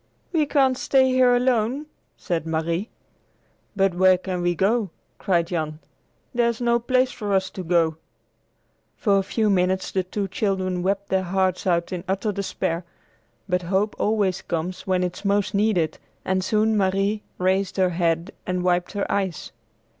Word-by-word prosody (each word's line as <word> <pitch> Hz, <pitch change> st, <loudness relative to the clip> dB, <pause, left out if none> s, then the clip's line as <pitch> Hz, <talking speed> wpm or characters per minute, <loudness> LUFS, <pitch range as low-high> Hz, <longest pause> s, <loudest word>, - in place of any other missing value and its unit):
"We 310 Hz, -4 st, +2 dB
can't 265 Hz, -3 st, +2 dB
stay 265 Hz, -1 st, +3 dB
here 255 Hz, -1 st, +4 dB
alone!" 250 Hz, +3 st, +1 dB, 0.3 s
said 165 Hz, -2 st, -3 dB
Marie. 165 Hz, +5 st, -1 dB, 0.9 s
"But 195 Hz, -2 st, +2 dB
where 185 Hz, +1 st, +5 dB
can 180 Hz, -1 st, -4 dB
we 175 Hz, 0 st, +1 dB
go?" 205 Hz, +3 st, +1 dB, 0.3 s
cried 170 Hz, -3 st, +1 dB
Jan. 155 Hz, -3 st, -3 dB, 0.6 s
"There's 235 Hz, -2 st, +1 dB
no 235 Hz, -1 st, +2 dB
place 255 Hz, +2 st, +2 dB
for 205 Hz, -2 st, -3 dB
us 190 Hz, -1 st, 0 dB
to 185 Hz, -, -6 dB
go 170 Hz, -1 st, +2 dB
to!" 160 Hz, -, -18 dB, 1.0 s
For 200 Hz, -3 st, +3 dB
a -, -, +2 dB
few 215 Hz, +3 st, 0 dB
minutes 185 Hz, -1 st, +1 dB
the 190 Hz, -, +1 dB
two 195 Hz, +2 st, -3 dB
children 185 Hz, -2 st, -1 dB
wept 200 Hz, +2 st, -1 dB
their 190 Hz, 0 st, +2 dB
hearts 185 Hz, 0 st, 0 dB
out 170 Hz, +1 st, +1 dB
in 175 Hz, -2 st, -4 dB
utter 195 Hz, +3 st, 0 dB
despair, 185 Hz, -3 st, -2 dB, 0.6 s
but 180 Hz, -1 st, +1 dB
hope 190 Hz, +4 st, 0 dB
always 205 Hz, -4 st, +1 dB
comes 175 Hz, +3 st, -4 dB
when 185 Hz, -1 st, +2 dB
it 180 Hz, -1 st, -3 dB
is -, -, -15 dB
most 200 Hz, 0 st, +1 dB
needed, 200 Hz, -6 st, +1 dB, 0.3 s
and 190 Hz, 0 st, 0 dB
soon 215 Hz, +3 st, +2 dB
Marie 195 Hz, +1 st, +1 dB, 0.2 s
raised 190 Hz, +1 st, 0 dB
her 185 Hz, -1 st, +3 dB
head 170 Hz, +1 st, 0 dB
and 180 Hz, -2 st, -2 dB
wiped 180 Hz, 0 st, +1 dB
her 200 Hz, -1 st, -1 dB
eyes. 190 Hz, -5 st, -2 dB
190 Hz, 165 wpm, -23 LUFS, 180-210 Hz, 1.0 s, where